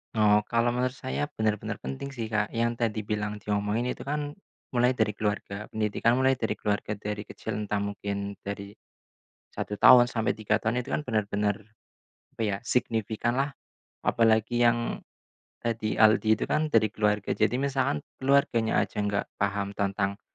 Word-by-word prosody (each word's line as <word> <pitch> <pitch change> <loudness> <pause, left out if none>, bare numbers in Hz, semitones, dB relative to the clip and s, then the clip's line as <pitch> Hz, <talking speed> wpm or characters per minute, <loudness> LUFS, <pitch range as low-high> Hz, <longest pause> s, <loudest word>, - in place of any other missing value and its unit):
Oh, 105 -1 +4
kalau 120 +1 +2
menurut 125 +1 +1
saya 130 +2 -4 0.2
benar-benar 110 -1 -1
penting 65 - -5
sih, 115 -5 -4
Kak. 105 -1 0
Yang 115 0 0
tadi 110 -1 0
bilang 105 0 -3
diomongin 105 +4 -1
itu - - -9
kan, 145 +1 -3 0.4
mulai 125 +1 +4
dari 110 -3 +2
keluarga 105 -1 -3
pendidikan 110 +3 +1
mulai 130 0 +4
dari 115 -3 -2
keluarga, 105 0 -1
dari 105 0 -4
kecil 110 0 -6
entah 105 0 -1
mungkin 100 0 -3
dari 100 0 -6 0.8
1 105 - -4
tahun 120 -1 +8
sampai 115 +1 0
3 110 0 0
tahun 120 +2 0
itu - - -2
kan - - 0
benar-benar, 105 -4 0 0.8
apa - - -7
ya, 105 -3 0
signifikanlah. 120 +4 0 0.5
Apalagi 115 +1 +2
yang, 120 0 +1 0.6
tadi 110 -2 -1
Aldi 110 0 +5
itu - - -2
kan, 155 0 0
dari 110 -6 +3
keluarga, 105 -2 +1
jadi 120 - +1
misalkan 135 - 0 0.2
keluarganya 130 -4 +2
aja - - -5
nggak 100 -1 -1
paham 100 0 0
tentang 100 0 -1
110 Hz, 155 wpm, -27 LUFS, 105-120 Hz, 0.8 s, tahun